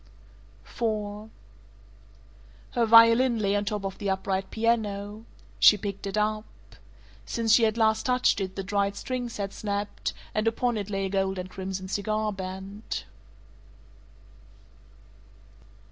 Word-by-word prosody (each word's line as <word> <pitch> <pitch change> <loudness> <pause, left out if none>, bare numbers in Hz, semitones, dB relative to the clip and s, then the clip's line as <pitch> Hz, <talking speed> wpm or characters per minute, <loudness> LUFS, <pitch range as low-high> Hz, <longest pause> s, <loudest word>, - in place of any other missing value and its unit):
IV 215 -2 -3 1.4
Her 240 -1 +2
violin 230 +2 +7
lay 200 -2 +1
on 205 0 0
top 205 -1 -3
of 195 - -5
the 200 - -2
upright 190 0 -1
piano. 215 -2 -1 0.3
She 210 - +8
picked 200 0 -5
it 195 +1 -3
up. 215 0 0 0.8
Since 225 - +1
she 230 0 +6
had 220 +1 0
last 220 0 +2
touched 250 -4 +2
it 190 0 -4
the 195 - -3
dried 200 +1 0
strings 245 +1 -4
had 200 -1 -3
snapped, 205 0 -3 0.2
and 215 +1 0
upon 240 +1 +1
it 205 -2 -4
lay 195 -1 -1
a - - -2
gold 195 0 0
and 185 0 -6
crimson 190 0 -5
cigar 215 +2 -1
band. 190 +2 -6
205 Hz, 130 wpm, -27 LUFS, 195-220 Hz, 1.4 s, She